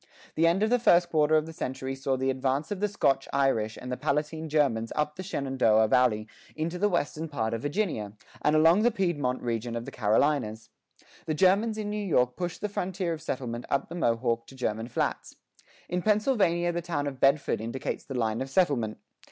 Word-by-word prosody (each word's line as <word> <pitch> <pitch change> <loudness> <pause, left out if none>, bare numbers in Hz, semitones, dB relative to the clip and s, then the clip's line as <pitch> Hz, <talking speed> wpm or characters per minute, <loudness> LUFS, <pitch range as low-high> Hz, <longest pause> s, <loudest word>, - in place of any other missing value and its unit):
The 165 +1 +3
end 180 +5 +2
of 220 - +1
the 245 - +4
first 175 -6 +4
quarter 155 0 +3
of 155 0 +3
the 165 - -9
century 130 -2 -4
saw 135 0 -1
the 130 +1 +1
advance 130 +4 -1
of 205 - -2
the 210 - +1
Scotch 135 -9 +1
Irish 115 -6 +1
and 125 - -7
the 125 - -2
Palatine 155 +2 -2
Germans 130 -7 +1
up 150 0 -1
the 185 - -6
Shenandoah 130 - +2
Valley 110 -4 +3 0.3
into 165 +3 -3
the 205 +2 +3
western 160 -2 -2
part 115 -6 -2
of 115 - -3
Virginia, 145 - -2 0.3
and 150 - +2
along 165 +6 +5
the 240 - +4
Piedmont 165 - -1
region 115 0 -2
of 115 0 -4
the - - -7
Carolinas.[5:2] 110 0 -1 0.2
The 155 - 0
Germans 200 +6 +3
in 210 -1 -3
New 210 0 -2
York 125 -10 +2
pushed 175 -1 -4
the 210 - 0
frontier 185 -3 -2
of 160 - -7
settlement 125 -5 -4
up 140 0 0
the - - -7
Mohawk 115 -5 0
to 135 - -13
German 110 -3 -2
Flats.[5:3] 120 - -5 0.2
In 180 0 -1
Pennsylvania 205 -5 +2
the 175 0 -2
town 160 -4 -2
of 135 -2 -5
Bedford 135 -4 +2
indicates 115 +4 -4
the 135 - -7
line 110 -1 0
of 135 - -4
settlement. 135 - +1
145 Hz, 200 wpm, -28 LUFS, 125-175 Hz, 0.3 s, along